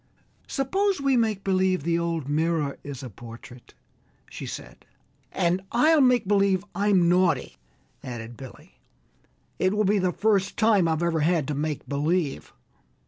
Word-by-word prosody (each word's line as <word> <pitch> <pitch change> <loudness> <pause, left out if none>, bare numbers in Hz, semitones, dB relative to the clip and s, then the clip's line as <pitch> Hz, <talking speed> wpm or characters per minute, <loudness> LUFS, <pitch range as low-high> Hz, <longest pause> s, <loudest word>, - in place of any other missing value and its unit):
"Suppose 380 +7 0
we 275 -1 +2
make 220 -4 0
believe 185 -4 +1
the 170 +1 +1
old 165 -4 -2
mirror 155 -1 -1
is 140 -2 -7
a 130 - -6
portrait," 120 +3 -13 0.6
she - - -7
said. - - -9 0.5
"And 180 0 0
I'll 305 +6 +4
make 250 -5 +3
believe 200 -1 +2
I'm 195 -2 +2
naughty," 170 - +1 0.5
added 120 -1 -7
Billy. 130 +1 -13 0.8
"It 185 +2 +1
will 215 - +2
be 200 +1 +2
the 185 -1 +1
first 200 -1 0
time 215 -6 +3
I've 160 +1 0
ever 170 -2 +1
had 155 -2 +1
to - - -1
make 150 +1 -3
believe!" 150 +2 -1
180 Hz, 145 wpm, -25 LUFS, 150-205 Hz, 0.8 s, I'll